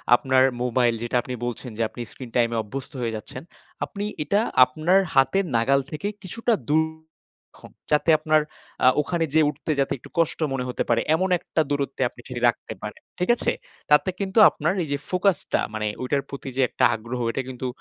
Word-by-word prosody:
আপনার 130 +1 +3 0.2
মোবাইল, 120 -1 +2
যেটা 120 - -3
আপনি 125 - -6
বলছেন 120 +1 -4
যে 115 - -2
আপনি 120 - -9
স্ক্রিন 125 -3 -10
টাইম 120 -1 +3
এ - - 0
অভ্যস্ত 130 +5 -7
হয়ে 115 -2 -2
যাচ্ছেন। 110 +4 -7 0.4
আপনি 200 - -6 0.2
এটা 200 +8 +2 0.2
আপনার 155 +9 +2
হাতের 135 +9 +3
নাগাল 135 +4 +3
থেকে 155 +7 -3 0.2
কিছুটা 230 +5 -1 0.2
দূর 160 +1 +4 0.7
রাখুন। - - -15 0.2
যাতে 150 +2 +2
আপনার 155 0 +3 0.4
আ - - +8
ওখানে 165 +2 -1
যেয়ে 155 -2 +5
উঠতে 150 +2 -4
যাতে 135 - +1
একটু - - -15
কষ্ট 165 - +1
মনে 130 -1 -1
হতে - - -1
পারে। 115 -1 +3
এমন 185 +3 0
একটা 160 -2 -1
দূরত্বে 140 -2 -2
আপনি 120 - -15
সেটি 125 -2 -6
রাখতে - - -5
পারেন, - - -7 0.2
ঠিক 180 - -1
আছে? - - 0 0.4
তাতে 150 +6 +5
কিন্তু 200 +2 +1
আপনার 165 +5 -1
এই - - -6
যে - - 0
ফোকাস 185 -2 +2 0.2
টা, - - +3
মানে 105 -1 -2
ওইটার 140 +2 0
প্রতি 140 -1 -7
যে - - +3
একটা - - -2
আগ্রহ 120 +3 -6
এটা 135 - -2
কিন্তু 130 0 -5
140 Hz, 195 wpm, -24 LUFS, 125-160 Hz, 0.7 s, আ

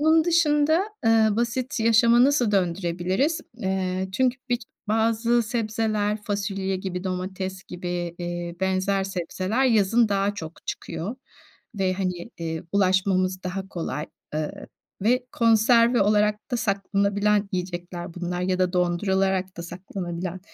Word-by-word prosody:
bunun 315 +1 +5
dışında, 315 0 +3 0.2
eee, 225 -1 +5
basit 240 +2 -1
yaşamı 230 +2 +5
nasıl 270 -6 +3
döndürebiliriz? 185 - 0 0.2
Eee, 190 -2 -1
çünkü 260 +3 +1
bik 245 -1 0 0.3
bazı 230 +2 +2
sebzeler 215 -2 -1
fasulye 195 -2 -2
gibi, 185 0 -5
domates 190 +1 -4
gibi, 175 -1 -4
eee, 175 0 -4
benzer 190 +1 +1
sebzeler 190 +6 -1
yazın 225 -1 +4
daha 200 0 +1
çok 165 -4 -9
çıkıyor 210 +10 -4 0.6
ve, 190 -2 +1
hani, 185 +2 -3
eee, 160 -1 -3
ulaşmamız 185 -1 +2
daha 190 +1 -4
kolay, 160 -4 -4 0.3
eee, 155 -1 -4 0.4
ve 250 +3 +2
konserve 230 +1 +4
olarak 210 +1 +1
da - - +2
saklanabilen 200 0 +1
yiyecekler 175 -1 -4
bunlar 180 0 -3
ya 185 0 0
da 185 -1 +1
dondurularak 190 +1 +1
da 170 - -5
saklanabilen 180 0 -5
195 Hz, 125 wpm, -25 LUFS, 185-225 Hz, 0.6 s, bunun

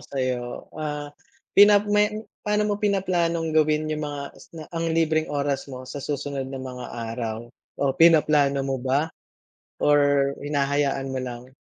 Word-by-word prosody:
sayo. 130 -3 -1 0.3
Ah, 150 -1 -4 0.5
pina 205 0 +8
may 210 0 +3 0.4
pa'no 210 0 +1
mo 205 - +1
pinaplanong 175 -5 0
gawin 155 0 +2
yung 150 0 -3
mga 145 -1 -4
isna 160 -2 -11
ang 165 0 -1
libreng 160 -1 +1
oras 140 -1 -1
mo 130 -1 -8
sa 145 - -6
susunod 140 -1 -3
na 135 -1 -6
mga 125 -1 -7 0.3
araw? 115 -2 -3 0.4
O - - +2
pinaplano 150 -4 +5
mo 135 -1 -1
ba? 135 +5 +1 0.7
Or 145 -1 +3
hinahayaan 140 -1 0
mo 130 0 -3
lang? 125 0 -7
145 Hz, 145 wpm, -24 LUFS, 135-165 Hz, 0.7 s, pina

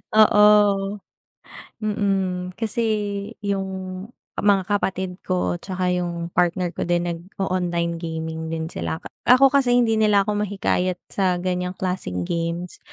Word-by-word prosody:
Oo. 210 -2 +5 0.9
Mm. 195 -3 0
Kasi, 225 0 -1 0.6
yung, 195 -1 -1 0.7
mga 200 -1 +2
kapatid 190 -2 -1
ko 180 -1 -1
tsaka 185 -1 -2
yung 170 -1 -2
partner 175 0 +1
ko 170 - -4
din 175 0 +1
nag-o-online 175 -1 -2
gaming 160 -1 -4
din 160 0 -4
sila. 85 -1 -3 0.3
Ako 260 +2 +7
kasi 265 -4 +3
hindi 225 -3 +3
nila 205 -2 +4
ako 205 +1 -1
mahikayat 185 -2 0 0.2
sa 185 -2 +1
ganyang 180 0 -2
klaseng 180 - -3
games. 170 - -3
185 Hz, 120 wpm, -23 LUFS, 170-205 Hz, 0.9 s, Ako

